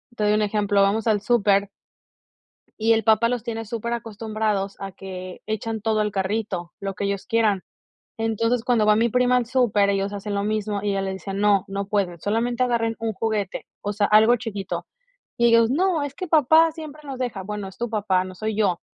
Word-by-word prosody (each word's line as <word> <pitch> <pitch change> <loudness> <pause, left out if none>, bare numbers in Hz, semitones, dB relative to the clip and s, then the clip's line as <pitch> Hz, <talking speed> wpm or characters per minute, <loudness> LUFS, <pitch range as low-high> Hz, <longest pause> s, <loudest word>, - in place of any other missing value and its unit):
te 215 - -2
doy 210 0 +3
un 215 - +2
ejemplo, 205 -1 +1
vamos 205 +3 +2
al 215 -3 +2
súper 200 -3 +2 1.1
y 225 +1 +4
el 225 - +1
papá 220 +2 +4
los 245 -2 -2
tiene 225 -2 -4
superacostumbrados 215 -3 -3
a 195 0 -6
que 185 -1 -8
echan 220 0 -3
todo 220 0 +1
al 210 0 0
carrito, 190 -2 -2
lo 195 -1 -4
que 200 - -3
ellos 200 -1 -2
quieran. 215 -4 +1 0.6
Entonces, 225 +1 0
cuando 240 -4 +2
va 210 0 +5
mi 230 +2 +3
prima 250 +2 +3
al 245 -2 +1
súper, 225 -5 +2
ellos 195 0 -1
hacen 205 0 -4
lo 200 - 0
mismo, 210 -1 -1
y 205 - 0
ella 195 0 0
le 190 0 -2
dice: 190 +1 -6
"No, 200 -1 +2
no 200 0 -3
pueden, 195 -4 -1
solamente 235 +6 0
agarren 230 -2 0
un 225 -1 -2
juguete", 210 -2 -2 0.2
o 205 - -2
sea, 205 0 +1
algo 220 +3 +6
chiquito. 210 -5 -5 0.5
Y 235 - +3
ellos: 230 0 +5
"No, 340 +2 +1
es 285 -1 -4
que 370 - -4
papá 315 +1 +5
siempre 310 -2 -9
nos 270 -3 -6
deja", 235 -6 -3
"Bueno, 205 0 -5
es 190 - -15
tu 240 - -2
papá, 200 -4 +1
no 185 0 -8
soy 215 +2 -3
yo". 185 -5 +1
215 Hz, 205 wpm, -23 LUFS, 200-230 Hz, 1.1 s, algo